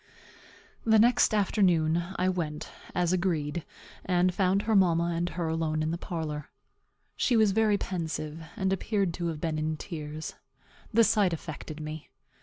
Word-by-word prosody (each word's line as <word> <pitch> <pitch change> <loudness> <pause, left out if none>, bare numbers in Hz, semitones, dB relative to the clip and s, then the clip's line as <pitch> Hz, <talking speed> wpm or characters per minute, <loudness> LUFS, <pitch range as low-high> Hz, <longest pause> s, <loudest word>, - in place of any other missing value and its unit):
The 220 -1 +5
next 235 +3 +5
afternoon 175 -6 +2
I 185 - +1
went, 165 -5 -2 0.2
as 180 0 +2
agreed, 170 -3 0 0.4
and 180 0 +2
found 195 +2 +2
her 220 -1 +1
mamma 170 -3 +3
and 170 +1 -1
her 170 -1 -3
alone 160 -1 0
in 155 - -1
the 170 - -2
parlor. 155 -5 -4 0.7
She 245 - +2
was 215 -2 +5
very 215 0 +3
pensive, 160 -4 -4
and 190 0 0
appeared 195 -2 0
to 170 0 -3
have 160 -2 -3
been 155 -1 -1
in 155 0 -1
tears. 155 -2 -6 0.6
The 230 +1 +5
sight 210 -5 +3
affected 155 -1 -6
me. 155 0 -7
175 Hz, 155 wpm, -28 LUFS, 155-195 Hz, 0.7 s, The